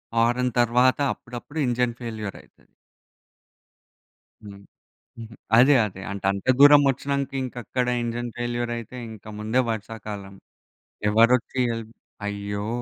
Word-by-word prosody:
Horn 120 +2 +2
తరువాత 125 +3 +3
అప్పుడప్పుడు 125 +6 -8
engine 120 -1 0
ఫెయిల్యూర‌యితది. 110 -4 -8 1.7
హ్మ్. 100 -1 -11 1.0
అదే, 135 +4 +7
అదే 95 -1 -9
అంటే 100 -1 -4
అంత 100 0 -7
దూరం 145 0 +9
వచ్చినంక 140 +1 -2
ఇంకక్కడ 125 0 -3 0.2
ఇంజన్ 120 +1 -3
ఫెయిల్యూరయితే, 120 0 -3
ఇంక 110 -2 -12
ముందే 110 +4 +1
వర్షాకాలం 105 -2 -6 0.8
ఎవరొచ్చి 115 +4 +3
హెల్ప్ 115 0 -7 0.3
అయ్యో! 100 +1 -4
120 Hz, 100 wpm, -24 LUFS, 105-125 Hz, 1.7 s, దూరం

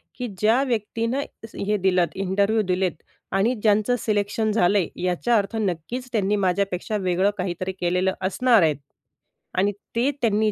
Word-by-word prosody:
की 250 -1 -4
ज्या 225 +6 +4
व्यक्तीनं 230 +1 -1 0.2
दि 225 - -7
हे 210 +1 +1
दिलत, 185 -2 +2
इंटरव्ह्यू 200 +3 +1
दिलेत 185 0 +1 0.4
आणि 200 +6 +2
ज्यांचं 215 +3 +3
सिलेक्शन 215 +1 0
झालंय, 200 -3 +3 0.2
याचा 180 +7 +1
अर्थ 205 +2 -1
नक्कीच 215 +6 -3
त्यांनी 210 -3 +1
माझ्यापेक्षा 195 +1 0
वेगळं 185 +1 +1
काहीतरी 185 0 -3
केलेलं 180 +2 +1
असणार 225 +4 +3
आहेत. 155 -4 +2 0.8
आणि 200 +2 +3 0.2
ते 240 +4 +2
त्यांनी 215 -2 +2
205 Hz, 145 wpm, -23 LUFS, 185-225 Hz, 0.8 s, ज्या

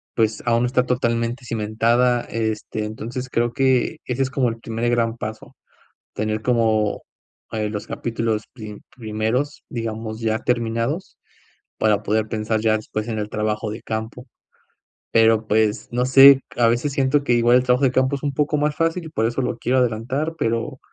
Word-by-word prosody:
pues, 110 -2 0
aún 115 0 +2
no 125 - +2
está 125 0 +1
totalmente 120 0 -1
cimentada. 115 +2 +1
Este, 110 -1 -3
entonces, 120 +4 -6
creo 120 0 0
que 130 +3 +2
ese 125 +1 -2
es 130 - -2
como 130 -2 +1
el 115 - -6
primer 115 +1 -2
gran 115 -1 +1
paso, 110 -1 -7 0.6
tener 110 0 -2
como, 110 -4 +1 0.5
eh, 110 -1 -2
los 105 -1 -5
capítulos 115 -2 -2
pri 110 -4 -9 0.2
primeros, 115 +5 -2
digamos, 110 -1 -4
ya 110 -1 0
terminados 120 +7 -2 0.6
para 105 -2 +2
poder 110 +1 0
pensar 110 0 -1
ya 110 -1 +2
después 110 0 -5
en 110 -2 -2
el 105 0 -4
trabajo 105 0 -2
de 110 - -7
campo. 110 +3 -5 0.9
Pero, 115 -1 +4
pues, 110 0 +1
no 125 +1 +1
sé, 135 +1 +8 0.2
a 120 -1 +4
veces 120 +5 0
siento 140 +1 +1
que 125 - +1
igual 120 +1 +4
el 125 - +1
trabajo 125 +2 +2
de 125 - +3
campo 130 +2 +2
es 140 - -11
un 145 - -1
poco 150 +2 0
más 150 0 0
fácil, 165 0 -1
por 115 -7 0
eso 120 +3 -1
lo 120 - -2
quiero 130 +2 +1
adelantar, 125 +6 -1
pero, 115 +4 -1
115 Hz, 175 wpm, -22 LUFS, 110-125 Hz, 0.9 s, sé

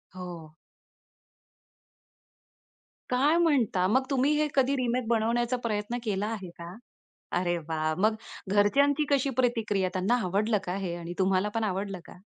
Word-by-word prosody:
हो. 170 -4 -8 2.5
काय 280 +6 +3
म्हणता, 260 - +2
मग 260 +7 +3
तुम्ही 275 +2 +2
हे 305 0 +2
कधी 270 0 +3
रिमेक 250 -2 -1
बनवण्याचा 235 +2 +1
प्रयत्न 210 +1 -2
केला 205 -1 -1
आहे 195 -5 -5
का? 170 +1 -8 0.7
अरे, 175 -1 0
वाह! 155 -1 -1
मग 215 +2 +3 0.3
घरच्यांची 275 +9 +3
कशी 275 -1 +2
प्रतिक्रिया? 220 -6 +1
त्यांना 190 +7 +1
आवडलं 210 +4 +1
का 180 0 -3
हे 170 - -2
आणि 170 0 -6
तुम्हाला 190 +1 +2
पण 225 -1 0
आवडलं 195 -1 -2
का? - - -13
215 Hz, 135 wpm, -28 LUFS, 185-250 Hz, 2.5 s, काय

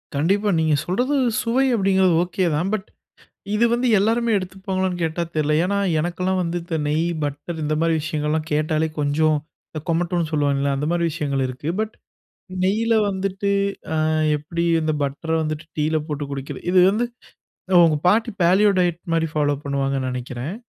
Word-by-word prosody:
கண்டிப்பா. 195 +8 +1
நீங்க 155 -2 +2
சொல்றது 245 +11 0 0.3
சுவை 245 +3 +1
அப்படிங்கிறது 190 -3 +3
ஓகே 185 +1 -1
தான். 175 +6 0
பட் 210 -1 -2 0.7
இது 220 +3 +3
வந்து 245 +1 +1
எல்லாருமே 230 +3 +1
எடுத்துப்பாங்களான்னு 185 -1 -3
கேட்டா? 165 +1 -1
தெர்ல. 155 -1 +1
ஏன்னா 200 +2 0 0.2
எனக்குலாம் 180 +3 -1
வந்து 170 0 -2
இந்த 170 -1 -3
நெய், 155 +3 +1 0.2
பட்டர் 145 +3 -5
இந்த 155 +1 0
மாதிரி 165 0 +2
விஷயங்கள்லாம் 155 0 -2
கேட்டாலே 155 +1 +1
கொஞ்சம் 150 +2 +2 0.3
இந்த 155 - -6
கொமட்டுனு 170 0 0
சொல்லுவாங்கல்ல, 140 -2 +1
அந்த 145 +2 -2
மாரி 170 0 +1
விஷயங்கள் 140 -4 -1
இருக்கு. 130 +4 -6
பட் 220 0 -2 0.7
நெய்யில 225 +4 +2
வந்துட்டு 195 +1 -2 0.4
அ - - 0 0.4
எப்படி 165 +3 -4 0.2
இந்த 155 0 0
பட்ர 140 +4 -4
வந்துட்டு 155 +1 -3
டீயில 155 +1 +1
போட்டு 150 -1 -3
குடிக்கிறது, 135 -1 -6
இது 185 - +5
வந்து 225 +4 0 0.8
உங்க 155 -2 +3
பாட்டி 225 +5 +2
பேலியோ 190 +4 +5
டயட் 175 -2 +1
மாரி 165 0 +1
ஃபாலோ 145 -1 +1
பண்ணுவாங்கன்னு 135 -2 -1
நெனக்கிறேன். 125 +5 -5
165 Hz, 155 wpm, -22 LUFS, 150-190 Hz, 0.8 s, இது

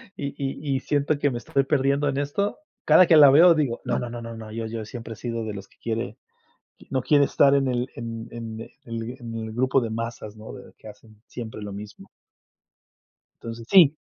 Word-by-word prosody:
y 140 -1 -5
y 135 -1 -4
y - - +1
siento 145 +1 0
que 145 -1 +2
me 120 - -3
estoy 135 +3 0
perdiendo 140 0 +1
en 140 -1 -1
esto, 145 - -1 0.3
cada 185 - +7
que 160 - +6
la 145 -2 +9
veo 165 +4 +7
digo, 135 -7 -1
no 125 - 0
no 120 - -3
no 120 0 -6
no, 115 -2 -8
yo 115 0 -4
yo 110 -1 -5
siempre 115 +1 -8
he - - -11
sido 115 0 -4
de 110 - -4
los 100 0 -8
que - - -28
quiere 115 -1 -3 0.7
no 130 -1 0
quiere 145 +2 +4
estar 140 0 +4
en 140 -1 +3
el 125 0 -1
en 115 0 -6
en 115 -1 -7 0.3
el 115 +1 -5
en 115 -2 -7
el 110 -1 -5
grupo 130 +3 +2
de 115 -2 -3
masas, 115 -1 -5
¿no? 110 0 -10
De - - -12
que - - -13
hacen 110 0 -15
siempre 110 -3 -7
lo 105 -1 -6
mismo. 105 +1 -10 1.3
Entonces, 115 0 -7
sí. 165 -6 +7
120 Hz, 215 wpm, -24 LUFS, 115-140 Hz, 1.3 s, la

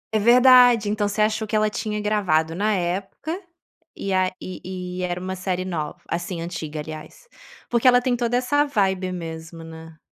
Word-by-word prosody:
É - - +4
verdade. 245 -1 +6
Então 210 0 0
você 210 +1 +1
achou 215 0 0
que 215 - -2
ela 215 0 +2
tinha 210 0 -3
gravado 185 -7 +1
na 210 +5 0
época, 195 - -3 0.5
e 195 - -3
a 185 0 +3
e 185 - -8 0.4
e 185 - -2
era 175 0 -2
uma 185 +1 -4
série 185 0 -2
nov 155 -5 -3
assim, 175 +1 -3
antiga, 165 -3 -5
aliás? 155 - -10 0.4
Porque 240 +1 +2
ela 245 0 +7
tem 245 0 0
toda 240 0 0
essa 290 +4 +2
vibe 190 -8 0
mesmo, 165 -1 -7
né. 160 0 -11
195 Hz, 180 wpm, -23 LUFS, 175-225 Hz, 0.5 s, ela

